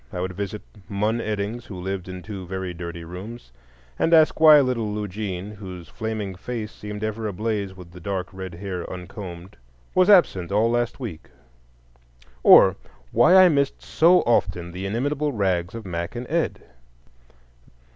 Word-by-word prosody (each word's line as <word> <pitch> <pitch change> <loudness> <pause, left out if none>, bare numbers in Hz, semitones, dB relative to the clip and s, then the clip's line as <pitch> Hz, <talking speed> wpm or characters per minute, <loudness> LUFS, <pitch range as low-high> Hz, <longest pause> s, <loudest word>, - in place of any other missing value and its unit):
I - - -5
would 90 +1 -3
visit 100 +2 -5 0.3
Mun 105 +3 0
Eddings, 110 +2 -3
who 95 -4 -8
lived 95 0 -4
in 90 -1 -7
two 100 -4 -7
very 95 -1 -4
dirty 85 0 -7
rooms, 90 - -9 0.5
and 165 - +4
ask 155 -1 +4
why 155 -2 +9
little 125 -6 0
Lugene, 105 -2 -4
whose 95 -4 -9
flaming 110 -3 -4
face 110 +3 -5
seemed 105 0 -7
ever 110 0 -2
ablaze 100 -1 -3
with 90 -2 -12
the 90 - -12
dark 95 0 -3
red 95 -2 -7
hair 90 -1 -5
uncombed, 90 0 -8 0.4
was 185 +2 +4
absent 100 - +4
all 110 +3 +3
last 120 +1 -1
week, 110 - -7 1.1
or - - +8 0.4
why 120 +11 +5
I - - +6
missed 140 -3 0
so 175 +3 +4
often 85 -7 0
the 95 +2 -5
inimitable 145 +7 -1
rags 95 -4 0
of 115 -2 -7
Mack 85 +2 -4
and 120 +1 -5
Ed. 165 0 -1
100 Hz, 155 wpm, -24 LUFS, 90-115 Hz, 1.1 s, why